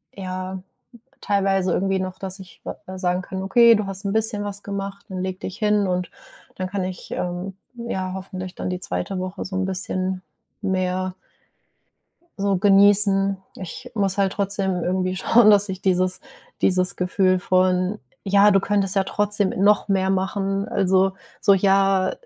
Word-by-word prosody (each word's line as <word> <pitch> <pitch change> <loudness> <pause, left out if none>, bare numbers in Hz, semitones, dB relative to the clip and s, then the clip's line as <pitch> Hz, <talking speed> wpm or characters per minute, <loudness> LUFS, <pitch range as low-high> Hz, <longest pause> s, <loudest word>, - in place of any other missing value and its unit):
ja, 185 -1 -5 0.6
teilweise 195 -2 +1
irgendwie 195 0 0
noch, 185 0 -5
dass 190 0 -6
ich 185 -2 -14
wa - - -4
äh, 185 0 -7
sagen 180 0 0
kann: 190 +1 -5
„Okay, 235 +4 +6
du 210 -2 -2
hast 195 +1 -6
'n 200 - -1
bisschen 220 -1 0
was 205 0 -6
gemacht, 200 0 -5
dann 185 -1 -5
leg 185 0 -4
dich 190 +1 -6
hin.” 210 -3 +2
Und 180 -1 -2 0.4
dann 185 - -3
kann 195 0 -2
ich, 185 -1 -7
ähm, 180 +2 -4 0.2
ja, 190 -6 -4
hoffentlich 185 -1 -6
dann - - -4
die 180 0 -3
2. 195 - -3
Woche 185 +1 -4
so 190 - -6
'n 190 - 0
bisschen 185 0 -2 0.4
mehr 185 -1 -1 1.2
so 200 0 +1
genießen. 195 0 +4 0.2
Ich 195 +7 -8
muss 195 -3 0
halt 195 -1 +2
trotzdem 195 -2 -1
irgendwie 185 +1 -1
schauen, 225 +3 +5
dass 205 0 +4
ich 190 -1 -5
dieses 185 -1 +1 0.4
dieses 185 -1 +2
Gefühl 185 0 +2
von 185 +1 +1 0.3
„Ja, 200 +1 +5
du 195 -1 +4
könntest 200 -1 0
ja 195 - +3
trotzdem 205 0 0
noch 210 +1 +4
mehr 190 -1 +1
machen.“ 195 +1 -1
habe. - - -11
Also 190 0 +3 0.3
so 200 - +5
ja, 195 -1 +3
190 Hz, 165 wpm, -22 LUFS, 185-200 Hz, 1.2 s, Okay